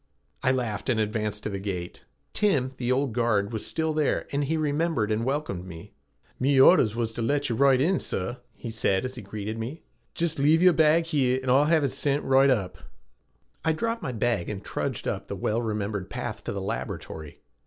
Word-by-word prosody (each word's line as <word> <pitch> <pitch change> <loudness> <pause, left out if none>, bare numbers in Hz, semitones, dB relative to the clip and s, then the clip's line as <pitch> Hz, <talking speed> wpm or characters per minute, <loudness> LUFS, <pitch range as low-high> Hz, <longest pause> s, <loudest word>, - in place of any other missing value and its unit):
I 130 - +3
laughed 120 -5 -2
and 120 -3 +2
advanced 105 -1 -2
to - - -2
the 100 - -3
gate. 90 -3 -5 0.3
Tim, 145 -12 +2
the 125 0 -1
old 130 -2 +1
guard, 110 -3 +1
was 110 - -3
still 160 -1 -1
there, 155 -2 0
and 140 0 0
he 160 +3 0
remembered 150 -6 0
and 110 +1 0
welcomed 130 -9 -2
me. 80 -2 -10 0.5
"Me 135 +1 +2
ordhers 130 - +6
wuz 115 -1 -1
t' 120 - -4
let 140 +3 0
yez 115 - -2
roight 135 -2 +5
in, 175 +7 +2
sor," 95 +7 -3 0.2
he 115 - -7
said 110 -1 +1
as 130 - -4
he 125 - -7
greeted 105 +2 -5
me. 130 +8 -6 0.3
"Jist 165 -3 0
lave 150 +4 +4
ye'er 180 -1 +7
bag 160 +1 +4
here 135 -6 +1
and 130 -1 -1
Oi'll 140 +3 +5
have 160 -1 +3
ut 135 - +1
sint 145 0 0
roight 135 +1 +5
up." 105 -8 0 0.8
I 160 - +2
dropped 230 +7 -2
my 130 - -3
bag 115 -5 0
and 100 -2 -5
trudged - - -3
up - - -3
the - - -4
well 110 +2 -1
remembered 105 -3 -3
path 120 -2 -5
to - - -2
the 100 - -4
laboratory. 80 -5 -5
125 Hz, 205 wpm, -26 LUFS, 105-145 Hz, 0.8 s, ye'er